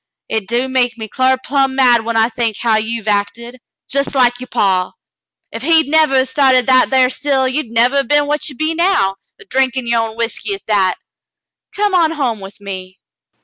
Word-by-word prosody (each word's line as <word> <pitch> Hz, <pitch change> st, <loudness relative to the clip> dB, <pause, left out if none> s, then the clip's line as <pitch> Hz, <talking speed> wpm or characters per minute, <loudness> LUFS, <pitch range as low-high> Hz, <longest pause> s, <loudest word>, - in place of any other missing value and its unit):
Hit 220 Hz, -3 st, -2 dB
do 240 Hz, +3 st, 0 dB
make 250 Hz, -2 st, 0 dB
me 220 Hz, -1 st, -6 dB
clar 260 Hz, +4 st, +1 dB
plumb 270 Hz, 0 st, -1 dB
mad 245 Hz, -4 st, +4 dB
when 230 Hz, 0 st, -2 dB
I 225 Hz, 0 st, +4 dB
think 230 Hz, -3 st, -3 dB
how 230 Hz, -2 st, +1 dB
you 225 Hz, +1 st, -3 dB
hev -, -, -12 dB
acted, 230 Hz, +4 st, -2 dB
— -, -, -12 dB
jes' 280 Hz, +1 st, -1 dB
like 245 Hz, -2 st, +2 dB
you' 255 Hz, -, -8 dB
paw. 190 Hz, -5 st, 0 dB, 0.6 s
Ef 230 Hz, -, -7 dB
he'd 320 Hz, +2 st, +3 dB
nevah 305 Hz, -4 st, +3 dB
'a' -, -, -1 dB
started 260 Hz, -2 st, +2 dB
that 255 Hz, -1 st, +4 dB
thar 260 Hz, -1 st, +4 dB
still, 270 Hz, -2 st, 0 dB
you'd 260 Hz, -1 st, -2 dB
nevah 240 Hz, +4 st, +2 dB
'a' -, -, +1 dB
been 290 Hz, +1 st, +2 dB
what 295 Hz, +2 st, -2 dB
ye 280 Hz, -, -10 dB
be 310 Hz, +4 st, -1 dB
now, 340 Hz, -, +1 dB, 0.2 s
a 440 Hz, -, -15 dB
drinkin' 260 Hz, -5 st, -1 dB
yer 235 Hz, 0 st, +1 dB
own 225 Hz, 0 st, -4 dB
whiskey 235 Hz, -, -3 dB
at 390 Hz, -, -15 dB
that. 195 Hz, -4 st, +1 dB, 0.8 s
Come 410 Hz, -1 st, -1 dB
on 330 Hz, -3 st, +2 dB
home 255 Hz, -8 st, -2 dB
with 195 Hz, +1 st, -11 dB
me." 190 Hz, -2 st, -8 dB
255 Hz, 210 wpm, -16 LUFS, 225-275 Hz, 0.8 s, mad